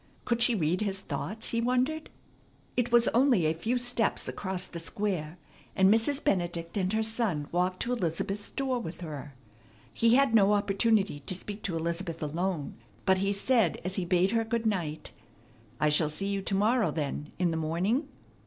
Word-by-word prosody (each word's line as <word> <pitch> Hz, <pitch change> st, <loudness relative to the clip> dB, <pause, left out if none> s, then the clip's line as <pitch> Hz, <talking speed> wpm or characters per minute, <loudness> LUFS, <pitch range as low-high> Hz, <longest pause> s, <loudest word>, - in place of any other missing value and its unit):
Could 235 Hz, 0 st, 0 dB
she 240 Hz, -1 st, +4 dB
read 175 Hz, 0 st, 0 dB
his 195 Hz, -2 st, -1 dB
thoughts? 220 Hz, +3 st, -3 dB
he 230 Hz, -, 0 dB
wondered. 255 Hz, +6 st, 0 dB, 0.7 s
It 245 Hz, -1 st, 0 dB
was 235 Hz, 0 st, +5 dB
only 245 Hz, -, +3 dB
a 155 Hz, -, +2 dB
few 220 Hz, +10 st, -1 dB
steps 245 Hz, -1 st, 0 dB
across 190 Hz, -2 st, -3 dB
the 170 Hz, -, -7 dB
Square, 175 Hz, -2 st, -3 dB, 0.4 s
and 190 Hz, +2 st, +5 dB
Mrs. 270 Hz, +6 st, +1 dB
Benedict 175 Hz, -2 st, -1 dB
and 190 Hz, -2 st, 0 dB
her 220 Hz, 0 st, +1 dB
son 220 Hz, -10 st, -1 dB
walked 180 Hz, +1 st, 0 dB
to 240 Hz, -, -3 dB
Elizabeth's 195 Hz, 0 st, -2 dB
door 265 Hz, -3 st, -1 dB
with 170 Hz, -6 st, -7 dB
her. 150 Hz, -4 st, -7 dB, 0.6 s
He 230 Hz, +1 st, +4 dB
had 275 Hz, -3 st, +4 dB
no 210 Hz, -2 st, +5 dB
opportunity 205 Hz, -3 st, +2 dB
to 145 Hz, +6 st, -5 dB
speak 205 Hz, +3 st, -8 dB
to 180 Hz, -, -1 dB
Elizabeth 170 Hz, 0 st, -3 dB
alone, 165 Hz, -1 st, -2 dB, 0.3 s
but 190 Hz, 0 st, +4 dB
he 195 Hz, +1 st, +1 dB
said 205 Hz, -2 st, +2 dB
as 185 Hz, -, -1 dB
he 190 Hz, -, 0 dB
bade 180 Hz, +2 st, +2 dB
her 225 Hz, 0 st, +2 dB
good 225 Hz, 0 st, -2 dB
night, 165 Hz, -8 st, -2 dB, 0.7 s
"I 150 Hz, -, +3 dB
shall 150 Hz, +1 st, +2 dB
see 195 Hz, +6 st, -3 dB
you 200 Hz, -1 st, -1 dB
to 195 Hz, +1 st, -2 dB
morrow, 215 Hz, 0 st, +3 dB
then, 150 Hz, 0 st, -3 dB
in 175 Hz, -2 st, +1 dB
the -, -, -1 dB
morning?" 180 Hz, -, 0 dB
195 Hz, 180 wpm, -29 LUFS, 170-230 Hz, 0.7 s, was